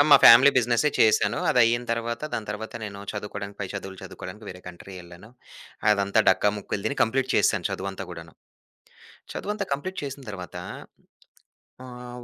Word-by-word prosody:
ఆ! -, -, +9 dB
మా 140 Hz, -, +11 dB
ఫ్యామిలీ 130 Hz, +5 st, +10 dB
బిజినెసే 120 Hz, +3 st, +3 dB
చేశాను. 110 Hz, 0 st, +4 dB
అది -, -, +2 dB
అయిన 120 Hz, +1 st, +2 dB
తరువాత, 115 Hz, +1 st, -3 dB
దాని 110 Hz, -, -4 dB
తరువాత 110 Hz, +1 st, -6 dB
నేను 100 Hz, -1 st, -7 dB
చదువుకోడానికి 100 Hz, -1 st, -6 dB
పై 100 Hz, -, -2 dB
చదువులు 95 Hz, -2 st, -7 dB
చదువుకోడానికి 95 Hz, +2 st, -9 dB
వేరే 90 Hz, 0 st, -9 dB
కంట్రీ 90 Hz, +2 st, -11 dB
ఎళ్ళాను. 85 Hz, +4 st, -14 dB, 0.6 s
అదంతా 100 Hz, +1 st, +3 dB
డక్కా, -, -, +4 dB
ముక్కలు 100 Hz, 0 st, -4 dB
తిని 140 Hz, -, -2 dB
కంప్లీట్ 130 Hz, +3 st, +1 dB
చేశాను -, -, +2 dB
చదువంతా 95 Hz, 0 st, -4 dB
కూడాను. 85 Hz, -1 st, -10 dB, 1.0 s
చదువంతా 210 Hz, -1 st, -3 dB
కంప్లీట్ 185 Hz, +7 st, -3 dB
చేసిన 140 Hz, -1 st, -6 dB
తరువాత, 90 Hz, -5 st, -8 dB, 1.3 s
ఆహ్, 125 Hz, -1 st, -9 dB
110 Hz, 150 wpm, -25 LUFS, 100-125 Hz, 1.3 s, మా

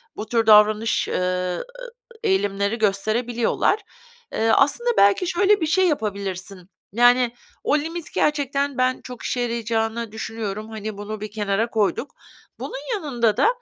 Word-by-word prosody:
bu 215 Hz, -, -5 dB
tür 230 Hz, 0 st, +1 dB
davranış, 215 Hz, +1 st, +5 dB
ııı, -, -, -1 dB, 1.1 s
eee, 435 Hz, -, +1 dB
eğilimleri 200 Hz, -, 0 dB
gösterebiliyorlar. 225 Hz, -, +1 dB, 0.5 s
Eee, 225 Hz, -, 0 dB
aslında 285 Hz, -, +3 dB
belki 200 Hz, -, +4 dB
şöyle 395 Hz, +3 st, +3 dB
bir -, -, +2 dB
şey 370 Hz, +4 st, +3 dB
yapabilirsin; 195 Hz, -, -4 dB, 0.2 s
yani, 245 Hz, +1 st, +4 dB, 0.3 s
o 295 Hz, -, +2 dB
limit 325 Hz, +2 st, -5 dB
gerçekten 280 Hz, -2 st, 0 dB
ben 255 Hz, 0 st, +1 dB
çok 250 Hz, -2 st, -9 dB
işe 250 Hz, -, -2 dB
yarayacağını 230 Hz, -1 st, -2 dB
düşünüyorum. 220 Hz, -1 st, -5 dB
Hani, 215 Hz, -1 st, -6 dB
bunu 205 Hz, +1 st, -6 dB
bir 215 Hz, -1 st, -6 dB
kenara 210 Hz, +1 st, -1 dB
koyduk. 225 Hz, +4 st, -1 dB, 0.4 s
Bunun -, -, -5 dB
yanında 240 Hz, -, 0 dB
da -, -, +4 dB
230 Hz, 135 wpm, -22 LUFS, 210-280 Hz, 1.1 s, davranış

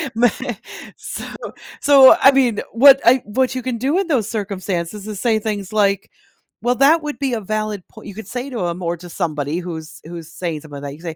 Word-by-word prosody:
Me 240 Hz, +1 st, +4 dB, 0.7 s
so -, -, -7 dB, 0.6 s
so, 275 Hz, -2 st, +8 dB
I 275 Hz, -, +8 dB
mean, 250 Hz, -6 st, +2 dB
what 270 Hz, +4 st, +7 dB
I 250 Hz, +2 st, +5 dB
what 255 Hz, +5 st, 0 dB
you 255 Hz, -, -2 dB
can 250 Hz, -1 st, -3 dB
do 275 Hz, +10 st, 0 dB
in 390 Hz, -, -1 dB
those 245 Hz, -, 0 dB
circumstances 195 Hz, -2 st, -4 dB
is 210 Hz, -3 st, -6 dB
say 225 Hz, -1 st, +2 dB
things 210 Hz, -3 st, -4 dB
like, 200 Hz, -1 st, +1 dB, 0.5 s
"Well, 245 Hz, +1 st, +2 dB
that 300 Hz, +5 st, +4 dB
would 295 Hz, -1 st, -5 dB
be 275 Hz, -3 st, -1 dB
a 225 Hz, -, -2 dB
valid 215 Hz, -1 st, -3 dB
poi" 220 Hz, -, -14 dB
you 205 Hz, -, -8 dB
could 220 Hz, -3 st, -9 dB
say 250 Hz, +4 st, -5 dB
to 230 Hz, -9 st, -3 dB
'em 170 Hz, +2 st, -4 dB
or 170 Hz, 0 st, -2 dB
to 175 Hz, +1 st, -12 dB
somebody 155 Hz, -2 st, -2 dB
who's 160 Hz, -3 st, -8 dB
who's 165 Hz, -1 st, -9 dB
saying 165 Hz, -4 st, -4 dB
something 145 Hz, -2 st, -10 dB
like -, -, -11 dB
that, 140 Hz, -, -5 dB
you -, -, -11 dB
could 170 Hz, -, -17 dB
215 Hz, 220 wpm, -19 LUFS, 175-255 Hz, 0.7 s, so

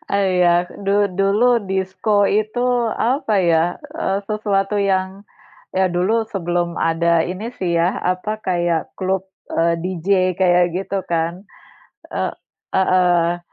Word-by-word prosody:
Iya. 180 Hz, -3 st, +2 dB, 0.2 s
Du 200 Hz, +1 st, +3 dB
dulu 220 Hz, +4 st, +3 dB
disko 190 Hz, +2 st, +1 dB
itu 215 Hz, +4 st, 0 dB, 0.4 s
apa 250 Hz, -2 st, 0 dB
ya, 170 Hz, -1 st, +2 dB, 0.2 s
eee, 195 Hz, -11 st, -1 dB
sesuatu 205 Hz, -1 st, 0 dB
yang 190 Hz, +1 st, -1 dB, 0.5 s
ya 190 Hz, -1 st, +2 dB
dulu 190 Hz, +6 st, +1 dB
sebelum 175 Hz, -2 st, -2 dB
ada 165 Hz, 0 st, +2 dB
ini 190 Hz, +6 st, -5 dB
sih 175 Hz, -2 st, -1 dB
ya, 170 Hz, +2 st, +1 dB
apa 210 Hz, +4 st, -3 dB
kayak 175 Hz, -3 st, -1 dB
klub, 190 Hz, 0 st, -1 dB, 0.3 s
eee, 170 Hz, +1 st, +2 dB
DJ, 180 Hz, -1 st, -5 dB, 0.3 s
kayak 180 Hz, -1 st, +4 dB
gitu 195 Hz, 0 st, -3 dB
kan? 170 Hz, +2 st, -1 dB, 0.7 s
E -, -, -2 dB, 0.5 s
heeh. 175 Hz, -2 st, +2 dB
185 Hz, 120 wpm, -20 LUFS, 175-200 Hz, 0.7 s, kayak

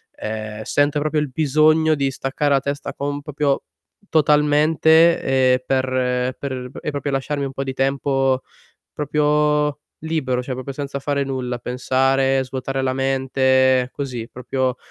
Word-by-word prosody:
ehm, 110 Hz, 0 st, -5 dB
sento 145 Hz, +6 st, +1 dB
proprio, 155 Hz, +1 st, 0 dB
il 150 Hz, -2 st, -2 dB
bisogno 155 Hz, +2 st, +3 dB
di 140 Hz, -1 st, 0 dB
staccare 135 Hz, +2 st, -2 dB
la 135 Hz, -, +4 dB
testa 140 Hz, +1 st, -4 dB
con 145 Hz, 0 st, -4 dB
proprio 145 Hz, -1 st, -1 dB, 0.5 s
totalmente, 155 Hz, +2 st, +4 dB, 0.3 s
ehm, -, -, +4 dB
per 130 Hz, -1 st, 0 dB
per 130 Hz, -2 st, -5 dB
e 150 Hz, -, -3 dB
proprio 145 Hz, 0 st, -3 dB
lasciarmi 140 Hz, +1 st, -2 dB
un 135 Hz, -, -6 dB
po' 135 Hz, -, -3 dB
di 135 Hz, -1 st, -4 dB
tempo 135 Hz, -1 st, +1 dB, 0.5 s
proprio 150 Hz, 0 st, +1 dB, 0.2 s
libero, 130 Hz, -6 st, -1 dB
cioè 130 Hz, -, -5 dB
proprio 130 Hz, +2 st, -5 dB
senza 140 Hz, 0 st, -4 dB
fare 140 Hz, 0 st, -1 dB
nulla, 130 Hz, -2 st, -3 dB
pensare, 135 Hz, +2 st, +1 dB
svuotare 135 Hz, +1 st, -4 dB
la 130 Hz, 0 st, 0 dB
mente, 130 Hz, -1 st, +2 dB
così 125 Hz, -5 st, -5 dB
proprio 130 Hz, +1 st, -2 dB
135 Hz, 140 wpm, -21 LUFS, 130-145 Hz, 0.5 s, la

